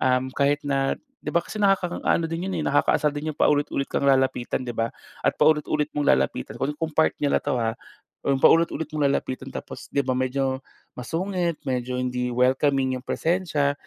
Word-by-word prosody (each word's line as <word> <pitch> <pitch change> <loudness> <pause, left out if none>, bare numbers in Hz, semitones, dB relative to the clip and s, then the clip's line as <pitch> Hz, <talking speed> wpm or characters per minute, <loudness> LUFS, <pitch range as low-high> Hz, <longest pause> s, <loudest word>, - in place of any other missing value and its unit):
um, 130 0 +2
kahit 145 +1 +2
na 135 -1 +1 0.3
'di - - -3
ba 170 - +3
kasi 195 - -9
nakakaano 180 -3 +2
din 165 +2 -3
'yon, - - -2
eh, - - -2
nakakaasar 150 +1 +3
din 150 +1 -3
'yong - - -22
paulit-ulit 145 -1 +2
kang - - -1
lalapitan 130 -2 +2
'di 120 - -4
ba, 115 0 -1 0.3
at - - +4
paulit-ulit 150 -1 +3
mong 145 -1 0
lalapitan 65 -1 -1
kung 150 +3 -2
part 160 +1 +3
nila 145 -1 +2
na - - -35
'to 145 - -1
ha. 115 -1 0 0.5
Kung 140 -1 +2
paulit-ulit 165 -1 +4
mong 150 -1 0
lalapitan 135 -1 -2
tapos 135 - -8
'di 140 - 0
ba 130 - 0
medyo 130 +1 0 0.4
masungit, 170 +5 -2
medyo 125 -1 -2
hindi 125 0 -1
welcoming 130 +2 +2
'yong 125 - -15
presensya, 160 -5 +1
140 Hz, 180 wpm, -24 LUFS, 130-155 Hz, 0.5 s, at